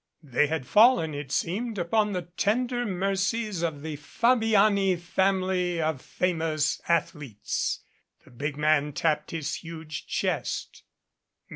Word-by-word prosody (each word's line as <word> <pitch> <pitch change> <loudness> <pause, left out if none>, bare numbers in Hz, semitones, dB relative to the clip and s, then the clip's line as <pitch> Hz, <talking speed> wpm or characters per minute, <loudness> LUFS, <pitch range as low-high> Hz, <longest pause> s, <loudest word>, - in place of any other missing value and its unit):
They 145 +1 +2
had 155 -3 -2
fallen, 215 - +5
it 145 -2 -6
seems, 215 +9 -1
upon 210 +4 +1
the 180 -1 -2
tender 240 +8 -1
mercies 195 +1 -1
of 155 -4 -2
the 155 -2 -4
Fabiani 210 - +3
Family 185 0 0
of 155 -4 -1
Famous 160 -4 -1
Athletes. 150 -9 -1 0.4
The - - -18
big 140 +4 -4
man 150 -1 +2
tapped 150 0 0
his 155 -1 -3
huge 160 -2 -7
chest. - - -2
170 Hz, 120 wpm, -27 LUFS, 155-200 Hz, 0.4 s, fallen